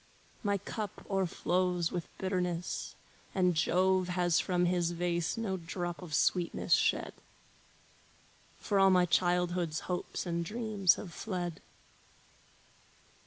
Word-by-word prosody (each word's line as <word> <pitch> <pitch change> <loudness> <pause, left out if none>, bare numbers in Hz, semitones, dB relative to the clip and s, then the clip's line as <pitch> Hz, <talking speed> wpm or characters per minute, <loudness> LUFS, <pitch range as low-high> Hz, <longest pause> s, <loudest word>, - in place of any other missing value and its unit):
My 200 -2 +1
cup 210 +1 -6
o'erflows 180 -2 0
with 175 -2 -3
bitterness, 180 -2 -2 0.4
and 180 -2 +3
Jove 185 +3 +2
Has 175 -2 +2
from 180 -2 +1
his 175 -1 +1
vase 170 0 -1
no 205 -4 -1
drop 175 +1 -4
of 165 -5 -4
sweetness 175 -2 +1
shed, - - +2 1.4
For 200 -3 0
all 195 0 +7
my 180 -1 +5
childhood's 175 -2 +1
hopes 180 +1 -3
and 170 -1 -1
dreams 210 -2 +2
have 170 - -8
fled. 175 -5 -4
180 Hz, 115 wpm, -32 LUFS, 175-190 Hz, 1.4 s, all